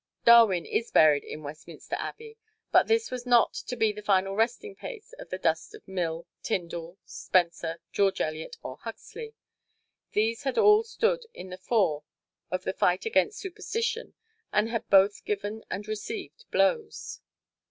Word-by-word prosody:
Darwin 225 -7 +7
is 235 - -1
buried 150 -2 +5
in 155 - -8
Westminster 150 +2 -7
Abbey, 450 0 -7 0.4
but - - +5
this 455 0 +2
was 250 -1 -5
not 240 -2 +5
to 250 - -5
be 220 -2 +2
the 210 0 -8
final 195 -1 +2
resting 240 - 0
place 470 +2 -9
of - - -10
the - - -3
dust - - -1
of 435 - -16
Mill, 170 -3 -3 0.2
Tyndall, 170 -3 -3
Spencer, 170 -2 0
George 195 -1 +2
Eliot 155 0 -3
or 130 - -6
Huxley. 445 - -9 0.8
These 225 +3 +1
had 270 -2 -2
all 420 -1 +7
stood 465 +1 0
in 185 - -9
the 180 - -6
fore 185 -8 +1 0.5
of 185 +1 -2
the - - -2
fight 180 0 +1
against 435 -1 +2
superstition 455 +4 -3 0.4
and 210 +2 +2
had 230 -1 -3
both 200 +1 +5
given 210 +2 -3
and 200 +3 -5
received 395 - -6
blows. 465 -3 0
215 Hz, 155 wpm, -28 LUFS, -, 0.8 s, Darwin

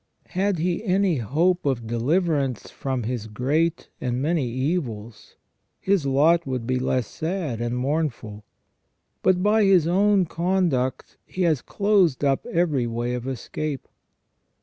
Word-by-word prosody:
Had 195 +1 0
he 175 +5 -1
any 190 -4 +2
hope 165 - +1
of 130 -5 -1
deliverance 135 - 0
from 130 -3 -3
his 115 -1 -3
great 150 +10 0
and 125 -1 -1
many 150 -1 0
evils 120 -5 -4 0.4
his 190 -7 +1
lot 155 +4 +3
would 130 -3 -3
be 130 +1 0
less 125 -1 0
sad 160 - -3
and 120 +1 -2
mournful; 125 -7 -2 0.8
but 180 0 +2
by 215 +1 +4
his 190 -5 +5
own 195 +2 +3
conduct 170 -7 -1
he 185 - -3
has 155 -7 +2
closed 200 -9 +2
up 135 -1 +1
every 155 -8 +1
way 120 +1 -2
of 125 +1 -4
escape. 135 +2 -4
145 Hz, 135 wpm, -24 LUFS, 125-180 Hz, 0.8 s, his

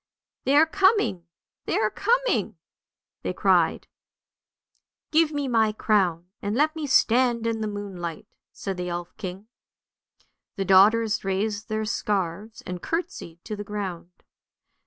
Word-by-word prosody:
" - - -67
They 275 - +3
are 310 +2 +7
coming, 380 - +2 0.4
they - - 0
are 215 -1 +1
coming! - - 0 0.3
" - - -68
they - - -3
cried. - - +2 0.6
" - - -52
Give 315 0 +4
me 290 -2 -2
my 220 -3 +2
crown, 185 -6 +1 0.2
and 205 +2 -2
let 310 +4 +2
me 310 -2 -4
stand 240 -2 +3
in 225 -1 -1
the 215 - -1
moonlight," 195 -5 -6 0.3
said 195 -2 -5
the 180 0 -3
elf 175 0 -5
king. 190 0 -6 1.1
The 195 - -2
daughters 210 +4 +4
raised 205 +2 -2
their 215 0 -1
scarves 205 0 -2
and 180 -1 -5
curtseyed 330 - -4
to 215 - -4
the 205 - -6
ground. 185 -4 -6
215 Hz, 145 wpm, -25 LUFS, 190-255 Hz, 1.1 s, are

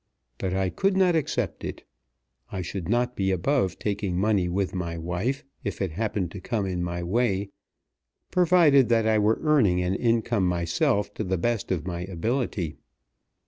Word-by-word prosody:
But 95 -1 -1
I 95 -1 0
could 190 - +1
not 185 -3 +4
accept 130 - -1
it. - - -6 0.7
I 95 -3 -3
should 90 -1 -5
not 120 +2 +1
be 95 -1 0
above 95 - +1
taking 100 -3 -2
money 95 -2 +2
with 95 +1 -1
my 85 -3 -3
wife, 90 +11 -2 0.2
if 100 -6 -4
it 95 -4 -1
happened 100 -1 -2
to 95 - -8
come 105 +1 -1
in 90 -2 -2
my 85 0 -3
way, 100 0 0 0.8
provided 165 -8 +5
that 115 -2 +3
I 110 -1 +3
were 105 +2 +3
earning 130 - +4
an 90 +1 0
income 115 -2 +1
myself 100 - 0
to 110 - -3
the 95 -1 -1
best 115 +4 -1
of 85 -4 -1
my 85 -2 -3
ability. 95 - -2
100 Hz, 170 wpm, -26 LUFS, 90-120 Hz, 0.8 s, provided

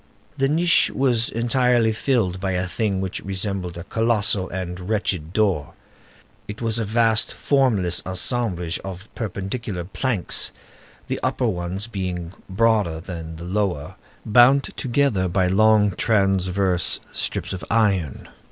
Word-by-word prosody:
The 135 -1 +1
niche 165 +3 +4
was 125 -4 +2
entirely 120 -1 +2
filled 110 -6 0
by 95 0 -1
a 90 0 0
thing 100 0 -1
which 95 -1 -3
resembled 95 -2 -3
a 85 - -6
colossal 105 -3 0
and 90 0 -5
wretched 95 -7 -1
door; 95 -8 0 0.7
it 105 - -7
was 115 -1 -1
a 115 - -1
vast, 110 +1 +2
formless 110 -11 +2
assemblage 90 -3 -1
of 95 +1 -8
perpendicular 100 -2 -4
planks, 105 +1 -1 0.6
the - - -3
upper 125 - 0
ones 95 -1 -2
being 90 -6 -4 0.2
broader 105 -5 +2
than 80 -2 -7
the 80 - -9
lower, 90 -5 -2 0.3
bound 125 +5 +6
together 120 -7 +1
by 90 +1 +1
long 105 +2 +4
transverse 95 -3 +1
strips - - -2
of 95 - -6
iron. 100 - +1
100 Hz, 130 wpm, -22 LUFS, 90-115 Hz, 0.7 s, bound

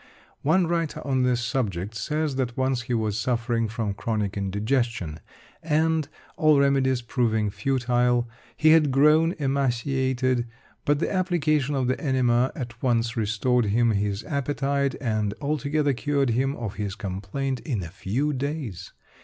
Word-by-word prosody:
One 175 +5 +3
writer 165 -2 -1
on 135 -2 +1
this 125 -1 +2
subject 105 -6 -2
says 150 +6 -2
that 125 -3 -2
once 130 -1 +1
he 125 0 -4
was 110 -1 -1
suffering 115 -1 0
from 110 -2 -3
chronic 105 -1 -2
indigestion 100 - -1 0.4
and, 160 -1 +1 0.3
all 155 -2 +5
remedies 135 -3 +2
proving 110 -4 0
futile; 125 -1 +1 0.3
he 155 0 +5
had 160 -2 +5
grown 150 +5 +4
emaciated, 130 -2 0 0.4
but 145 0 +3
the 160 - -1
application 155 -6 +1
of 130 -2 0
the 130 - -1
enema 130 -4 +2
at 120 -3 -7
once 120 -1 +1
restored 115 +2 +1
him 115 +3 +2
his 100 0 -1
appetite, 140 0 -1
and 110 -4 -1
altogether 145 0 0
cured 140 0 0
him 135 +4 0
of 110 -4 -5
his 100 -2 -3
complaint 105 +8 -3
in 120 - -3
a 85 - -6
few 120 - -2
days. 135 - -4
130 Hz, 145 wpm, -25 LUFS, 115-140 Hz, 0.4 s, all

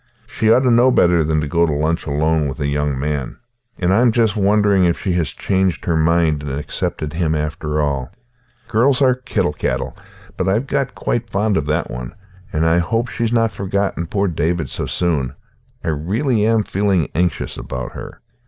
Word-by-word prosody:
She 110 0 +1
ought 125 - +5
to 130 -2 +3
know 120 +2 +5
better 90 -8 +4
than 75 0 +1
to 75 - -3
go 85 +2 +2
to - - 0
lunch 80 +3 -1
alone 75 +1 +1
with 70 +2 -6
a 70 - -1
young 70 -1 0
man, 70 -2 -3 0.4
and 90 -1 +1
I 110 - +4
am 125 -2 +5
just 110 -2 +2
wondering 100 -1 +3
if 85 -1 +2
she 95 - -2
has 85 -4 0
changed 95 -7 -1
her 85 - +1
mind 80 -1 +2
and 70 -2 -5
accepted 75 +1 -3
him 80 -2 0
after 75 0 -2
all. 70 -3 -1 0.6
Girls 125 +5 +3
are 130 -1 +5
kittle 105 -10 -1
cattle, - - -2 0.4
but 95 +1 0
I've 110 +7 +1
got 135 -7 -2
quite 115 +4 -2
fond 105 +1 +1
of 75 -3 -1
that 75 +3 -1
one, 60 +2 -6 0.4
and 80 +1 0
I 80 +1 +3
hope 115 +7 -1
she's 115 0 -2
not 115 -2 +2
forgotten 100 -3 -2
poor 100 +3 0
David 80 -2 -1
so - - -3
soon. 75 -8 -1 0.5
I - - -1
really 105 - 0
am 115 -1 +3
feeling 95 -5 0
anxious 90 +1 -1
about 65 -1 -5
her." - - -9
85 Hz, 195 wpm, -19 LUFS, 75-105 Hz, 0.6 s, ought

